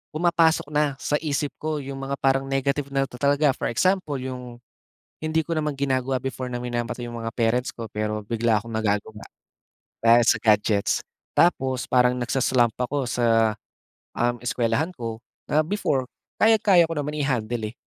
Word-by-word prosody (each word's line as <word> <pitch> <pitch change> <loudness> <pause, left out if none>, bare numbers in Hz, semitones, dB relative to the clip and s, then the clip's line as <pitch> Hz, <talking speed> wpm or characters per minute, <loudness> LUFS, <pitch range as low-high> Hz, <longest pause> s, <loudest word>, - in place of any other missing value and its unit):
pumapasok 165 -2 +3
na 150 -2 +1
sa 150 - -1
isip 145 -1 -1
ko 155 -1 -2
iyong 140 -1 -6
mga 135 +1 -4
parang 135 0 +2
negative 140 +1 0
na 135 0 +1
talaga. 140 +3 +2
For - - -2
example, 185 +3 +1
iyong 125 -2 -7 0.6
hindi 155 +1 +1
ko - - -10
naman 150 -2 -1
ginagawa 130 -1 0
before 130 -1 -4
na 120 - -3
minamata 120 0 -3
iyong 120 0 -6
mga 115 - -3
parents 120 +2 +1
ko 115 -1 -7
pero 105 0 -3
bigla 115 -1 +1
akong 115 - -10
nagagawa, 105 0 -1 0.8
dahil 115 +1 +6
sa - - +4
gadgets. 105 -1 +2 0.4
Tapos 130 -7 +2
parang 125 0 +4
nagsa-slump 120 -1 +1
ako 135 +2 -1
sa, 115 -2 +2 0.7
um, 120 0 +2
eskuwelahan 125 +5 0
ko, 115 -4 -5 0.3
na 155 +1 +4
before 155 -9 0 0.4
kayang-kaya 210 -5 +5
ko 165 - -3
naman 150 +1 -3
i-handle 120 -5 -1
eh. - - -23
130 Hz, 160 wpm, -24 LUFS, 115-145 Hz, 0.8 s, dahil